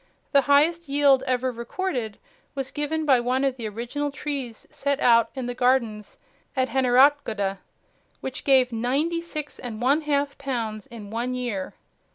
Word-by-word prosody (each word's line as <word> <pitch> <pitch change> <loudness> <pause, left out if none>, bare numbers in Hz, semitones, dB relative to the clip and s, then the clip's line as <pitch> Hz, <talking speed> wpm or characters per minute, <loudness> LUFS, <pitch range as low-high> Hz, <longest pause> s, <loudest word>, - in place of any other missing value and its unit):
The 280 - +6
highest 300 +3 +3
yield 280 -2 +4
ever 255 0 0
recorded 240 - -4 0.4
was 270 -1 -3
given 310 +1 -2
by 265 -4 +5
one 250 +3 0
of 270 -2 +1
the 235 -4 -5
original 240 +7 -3
trees 275 -5 -5
set 280 -2 -1
out 230 -2 +5
in 260 -2 -4
the 245 - -3
gardens 245 -4 0 0.4
at 260 -1 +1
Heneratgoda, 250 -7 +3 0.6
which 265 - -5
gave 260 -2 +4
ninety 275 +9 0
six 305 -3 -6
and 225 -3 -6
one 275 +6 +3
half 285 -2 -1
pounds 230 -6 -3
in 215 -3 -10
one 240 +3 -2
year. 235 -7 -4
260 Hz, 155 wpm, -25 LUFS, 235-285 Hz, 0.6 s, The